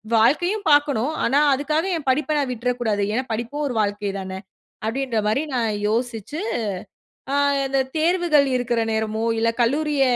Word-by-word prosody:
வாழ்க்கையும் 350 Hz, -, +2 dB
பார்க்கனும், 290 Hz, -2 st, +3 dB
ஆனா 270 Hz, +5 st, +3 dB
அதுக்காக 305 Hz, +5 st, 0 dB
என் 295 Hz, -4 st, -9 dB
படிப்ப 300 Hz, +3 st, +1 dB
நான் 280 Hz, -3 st, 0 dB
விட்றக்கூடாது, 240 Hz, -3 st, -1 dB
ஏனா 255 Hz, +4 st, 0 dB
படிப்பும் 235 Hz, +7 st, -3 dB
1 260 Hz, -, -3 dB
வாழ்க்கை 205 Hz, -1 st, -1 dB
தானே, 190 Hz, 0 st, -6 dB, 0.5 s
அப்டின்ற 235 Hz, 0 st, -1 dB
மாரி 225 Hz, +8 st, +1 dB
நான் 230 Hz, -3 st, +1 dB, 0.2 s
யோசிச்சு, 230 Hz, -, -2 dB, 0.9 s
ஆ -, -, +1 dB, 0.3 s
இந்த 270 Hz, 0 st, +1 dB, 0.2 s
தேர்வுகள் 325 Hz, -3 st, +3 dB
இருக்குற 240 Hz, -1 st, 0 dB
நேரமோ 220 Hz, 0 st, -1 dB
இல்ல 230 Hz, 0 st, +2 dB
கல்லூரிய 290 Hz, +3 st, +1 dB
255 Hz, 140 wpm, -22 LUFS, 225-295 Hz, 0.9 s, பார்க்கனும்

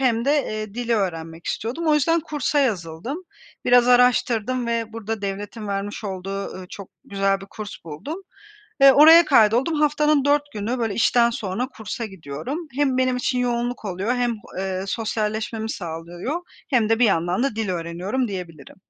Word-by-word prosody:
hem 235 Hz, -3 st, +2 dB
de, 280 Hz, -, +2 dB
eee, 215 Hz, -1 st, -5 dB
dili 240 Hz, -1 st, 0 dB
öğrenmek 165 Hz, -5 st, -3 dB
istiyordum. 255 Hz, +10 st, -3 dB
O 310 Hz, -, +4 dB
yüzden 330 Hz, +3 st, +2 dB
kursa 295 Hz, -2 st, -1 dB
yazıldım. 210 Hz, -, -1 dB, 0.5 s
Biraz 245 Hz, 0 st, +5 dB
araştırdım 250 Hz, -1 st, +3 dB
ve 230 Hz, -1 st, -2 dB
burada 225 Hz, -1 st, -5 dB
devletin 205 Hz, +2 st, -5 dB
vermiş 200 Hz, +2 st, -4 dB
olduğu, 195 Hz, 0 st, -4 dB
ııı, 185 Hz, -1 st, -8 dB
çok 200 Hz, -2 st, -9 dB, 0.2 s
güzel 195 Hz, 0 st, 0 dB
bir 195 Hz, -, -10 dB
kurs 210 Hz, +1 st, -8 dB
buldum 280 Hz, -, -7 dB, 0.6 s
ve 275 Hz, -1 st, +9 dB
oraya 325 Hz, +3 st, +9 dB
kaydoldum. 245 Hz, +3 st, +4 dB
Haftanın 300 Hz, -1 st, +3 dB
4 290 Hz, 0 st, +3 dB
günü, 220 Hz, +4 st, -2 dB
böyle, 225 Hz, -3 st, -1 dB
işten 235 Hz, +1 st, +3 dB
sonra 225 Hz, +2 st, -3 dB
kursa 225 Hz, -2 st, -6 dB
gidiyorum. 195 Hz, -, -6 dB
Hem 275 Hz, -2 st, +1 dB
benim 255 Hz, -1 st, +2 dB
için 250 Hz, 0 st, 0 dB
yoğunluk 240 Hz, -1 st, -1 dB
oluyor 195 Hz, +5 st, -1 dB
hem, 240 Hz, -2 st, 0 dB, 0.2 s
eee, 190 Hz, -1 st, -2 dB
sosyalleşmemi 220 Hz, +1 st, -2 dB
sağlıyor 175 Hz, -, -5 dB, 0.3 s
hem 235 Hz, -6 st, +2 dB
de 225 Hz, +1 st, +2 dB
bir 245 Hz, -, +6 dB
yandan 180 Hz, +2 st, +1 dB
da 275 Hz, -6 st, -1 dB
dil 220 Hz, -3 st, -2 dB
öğreniyorum, 180 Hz, +8 st, -2 dB
diyebilirim. 170 Hz, -8 st, -8 dB
225 Hz, 160 wpm, -23 LUFS, 195-255 Hz, 0.6 s, ve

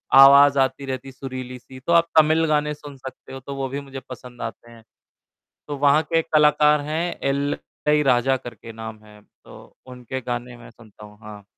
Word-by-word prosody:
आवाज़ 140 Hz, +1 st, +8 dB
आती 135 Hz, +1 st, 0 dB
रहती 130 Hz, 0 st, -5 dB
है -, -, -9 dB
सुरीली-सी, 130 Hz, 0 st, -9 dB
तो 170 Hz, +6 st, -1 dB
आप 170 Hz, 0 st, +4 dB
तमिल 155 Hz, +1 st, +3 dB
गाने 150 Hz, 0 st, +1 dB
सुन 145 Hz, -1 st, -11 dB
सकते 130 Hz, 0 st, -11 dB
हो, 135 Hz, -, -7 dB
तो 140 Hz, +2 st, -8 dB
वो 135 Hz, -1 st, -3 dB
भी 140 Hz, +2 st, -4 dB
मुझे 135 Hz, -1 st, -9 dB
पसंद 125 Hz, -1 st, -11 dB
आते 120 Hz, -, -7 dB
हैं। 115 Hz, -1 st, -16 dB, 0.8 s
तो 145 Hz, -, -5 dB
वहाँ 145 Hz, +2 st, +4 dB
के 165 Hz, -, -1 dB
एक 165 Hz, -, -4 dB
कलाकार 150 Hz, 0 st, +4 dB
हैं 160 Hz, +4 st, -3 dB
इलैयाराजा 140 Hz, -2 st, 0 dB
करके 115 Hz, -2 st, -11 dB
नाम 110 Hz, -1 st, -8 dB
है, 105 Hz, 0 st, -17 dB
तो -, -, -18 dB
उनके 125 Hz, +1 st, -7 dB
गाने 120 Hz, 0 st, -5 dB
मैं 120 Hz, -, -14 dB
सुनता 110 Hz, -2 st, -16 dB
हूँ, 105 Hz, 0 st, -16 dB
हाँ। 105 Hz, -2 st, -11 dB
135 Hz, 185 wpm, -22 LUFS, 120-145 Hz, 0.8 s, आवाज़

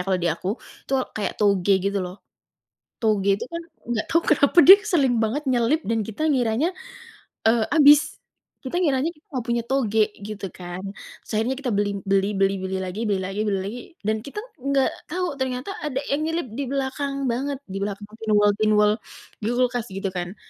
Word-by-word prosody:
kalau 190 Hz, -, +2 dB
di 175 Hz, -, +2 dB
aku 185 Hz, -, -3 dB, 0.4 s
itu 270 Hz, -, -1 dB, 0.2 s
kayak 210 Hz, -, -2 dB
toge, 200 Hz, -2 st, +3 dB
gitu 200 Hz, +1 st, 0 dB
loh. 180 Hz, -1 st, -4 dB, 0.9 s
Toge 205 Hz, -3 st, +2 dB
itu -, -, -5 dB
kan 335 Hz, -, -3 dB, 0.3 s
nggak 225 Hz, -2 st, -1 dB
tahu 335 Hz, -, +3 dB
kenapa 285 Hz, +1 st, +3 dB
dia 385 Hz, +2 st, +12 dB, 0.2 s
sering 265 Hz, -7 st, +3 dB
banget 270 Hz, +8 st, -1 dB
nyelip 250 Hz, +6 st, +2 dB
dan 225 Hz, +1 st, 0 dB
kita 225 Hz, +9 st, -3 dB
ngiranya, 270 Hz, +3 st, +1 dB, 0.7 s
eee, 225 Hz, 0 st, +4 dB
habis, 295 Hz, 0 st, +6 dB, 0.4 s
kita 260 Hz, +4 st, -5 dB
ngiranya 275 Hz, -2 st, +2 dB
kita 300 Hz, -, -28 dB
nggak 255 Hz, -4 st, -3 dB
punya 235 Hz, 0 st, 0 dB
toge, 220 Hz, -5 st, +2 dB, 0.2 s
gitu 210 Hz, -2 st, -6 dB
kan. 175 Hz, +1 st, -8 dB, 0.4 s
Terus -, -, -12 dB
akhirnya 245 Hz, +4 st, 0 dB
kita 260 Hz, -4 st, -2 dB
beli 205 Hz, 0 st, +1 dB
beli 195 Hz, 0 st, +2 dB
beli 195 Hz, 0 st, +3 dB
beli 190 Hz, 0 st, -3 dB
lagi 185 Hz, +3 st, -5 dB
beli 200 Hz, -2 st, +1 dB
lagi 195 Hz, +2 st, -4 dB
beli 195 Hz, -2 st, +1 dB
lagi 215 Hz, +6 st, -5 dB, 0.3 s
dan 220 Hz, 0 st, +2 dB
kita 280 Hz, +9 st, -6 dB, 0.2 s
enggak 275 Hz, 0 st, +1 dB, 0.2 s
tahu 350 Hz, -4 st, -3 dB
ternyata 260 Hz, +5 st, -2 dB
ada 295 Hz, -4 st, -2 dB
yang 285 Hz, +2 st, +1 dB
nyelip 325 Hz, -3 st, -2 dB
di 275 Hz, +5 st, -3 dB
belakang 275 Hz, +1 st, -2 dB, 0.2 s
banget, 275 Hz, +3 st, -2 dB
di 195 Hz, -7 st, -7 dB
belakang 205 Hz, +1 st, -5 dB
pinwall-pinwall, 210 Hz, 0 st, +3 dB, 0.5 s
di 210 Hz, -, -3 dB
kulkas, 245 Hz, -2 st, 0 dB
gitu 195 Hz, 0 st, -3 dB
kan. 180 Hz, +1 st, -5 dB
230 Hz, 180 wpm, -24 LUFS, 200-275 Hz, 0.9 s, dia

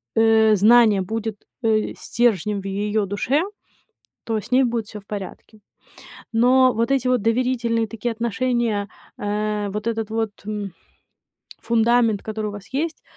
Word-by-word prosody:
э, 220 Hz, -1 st, +5 dB
знание 215 Hz, 0 st, +5 dB
будет, 220 Hz, +2 st, -3 dB, 0.3 s
э, 220 Hz, -1 st, +1 dB
стержнем 210 Hz, -4 st, 0 dB
в -, -, -14 dB
её 205 Hz, +2 st, -1 dB
душе, 230 Hz, -, 0 dB, 0.8 s
то 225 Hz, -1 st, -1 dB
с 215 Hz, +3 st, -6 dB
ней 260 Hz, +1 st, +5 dB
будет 235 Hz, -3 st, -1 dB
всё 210 Hz, -, -9 dB
в -, -, -26 dB
порядке. 205 Hz, +1 st, -8 dB, 0.8 s
Но 255 Hz, +2 st, +5 dB
вот 230 Hz, +3 st, 0 dB
эти 265 Hz, -2 st, +1 dB
вот 250 Hz, -4 st, +2 dB
доверительные 230 Hz, -1 st, 0 dB
такие 230 Hz, +2 st, -3 dB
отношения, 230 Hz, -2 st, -1 dB, 0.3 s
э, 210 Hz, 0 st, -2 dB
вот 210 Hz, +2 st, -4 dB
этот 225 Hz, -2 st, -2 dB
вот, 225 Hz, -1 st, -1 dB, 0.2 s
м, 205 Hz, -3 st, -4 dB, 0.9 s
фундамент, 230 Hz, -2 st, +2 dB
который 215 Hz, -1 st, -4 dB
у -, -, -4 dB
вас 205 Hz, -1 st, -10 dB
есть, 315 Hz, +3 st, -2 dB
225 Hz, 145 wpm, -22 LUFS, 210-235 Hz, 0.9 s, э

